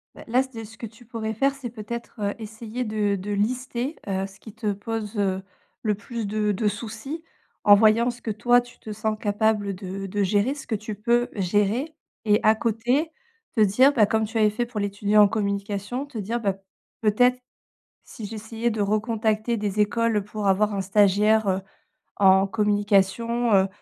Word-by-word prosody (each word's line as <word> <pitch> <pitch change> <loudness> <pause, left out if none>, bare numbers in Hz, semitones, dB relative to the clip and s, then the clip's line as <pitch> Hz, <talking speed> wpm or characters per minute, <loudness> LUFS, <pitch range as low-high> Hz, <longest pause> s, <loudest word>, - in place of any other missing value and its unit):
Bah, - - -11
là, 250 +3 +3
c 265 - -13
de - - -6
ce 225 +1 -12
que 230 - -6
tu 230 +2 -13
pourrais 220 -2 -4
faire, 275 +5 +1
c'est 250 -4 -7
peut-être, 235 +1 -7
heu, 205 0 -1
essayé 220 +2 -6
de 210 -2 0
de 200 +2 -5
lister, 245 +6 -1
heu, 195 0 -1
ce 195 +1 -18
qui 220 - -12
te 215 -2 -2
pose, 210 +1 -5
heu, 190 -1 0 0.4
le 210 -2 0
plus 225 +1 -5
de 210 0 0
de 210 +2 0
soucis 225 - -5 0.4
en 205 - +8
voyant 220 +3 +4
ce 240 - -14
que 225 - -5
toi, 240 +4 +4
tu 245 0 -16
te 215 - -8
sens 215 +1 -2
capable 205 -1 +1
de 195 +1 -6
de 200 +1 -1
gérer 205 +7 +2
ce 285 - -10
que 225 - -1
tu 215 +1 -5
peux 240 +4 +1
gérer. 210 - 0 0.3
Et 210 0 +4
à 215 - +6
côté 240 +8 0 0.4
te 220 - +3
dire, 250 +8 +5
bah, 220 -6 +5
comme 220 +1 +1
tu 225 +2 -4
avais 215 -1 +4
fait 240 +3 -1
pour 235 -3 -5
l'étudiant 205 +1 +3
en - - +6
communication, 200 +4 -2
te 265 -6 -9
dire: 220 +4 -2
«Bah, 200 -4 0 0.5
peut-être, 245 +4 +3 0.7
si 220 - -10
j'essayais 225 +2 -3
de 215 -1 -3
recontacter 215 +2 0
des 210 0 -2
écoles 220 0 +2
pour 210 -1 -5
avoir 205 +2 +2
un 195 - -1
stagiaire, 205 +2 +3
heu, 190 0 +1 0.6
en 190 0 +5
communication, 210 +3 +1
heu 190 0 +4
215 Hz, 190 wpm, -24 LUFS, 205-235 Hz, 0.7 s, en